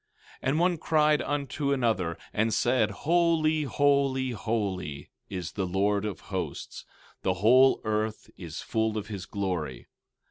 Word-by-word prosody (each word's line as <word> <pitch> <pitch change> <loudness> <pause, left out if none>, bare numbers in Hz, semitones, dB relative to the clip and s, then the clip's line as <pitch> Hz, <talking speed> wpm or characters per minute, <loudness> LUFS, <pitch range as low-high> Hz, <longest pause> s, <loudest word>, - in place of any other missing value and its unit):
16:3 - - -3
And 150 +4 +1
one 175 0 +2
cried 150 -2 +3
unto 140 0 -2
another, 110 -10 0 0.2
and 110 +2 +1
said: 125 +3 +2
Holy, 160 -2 +2
holy, 140 -2 +2
holy, 100 -9 -3 0.2
is 90 -4 -4
the 95 -2 -2
Lord 100 +3 +1
of 105 -3 -4
Hosts; - - -5 0.4
the 95 -1 0
whole 125 +8 +5
earth 110 0 -2
is 85 -3 -7
full 110 -1 -1
of 105 0 -5
his 95 -3 -6
glory. 90 -10 -3
110 Hz, 140 wpm, -28 LUFS, 95-140 Hz, 0.4 s, whole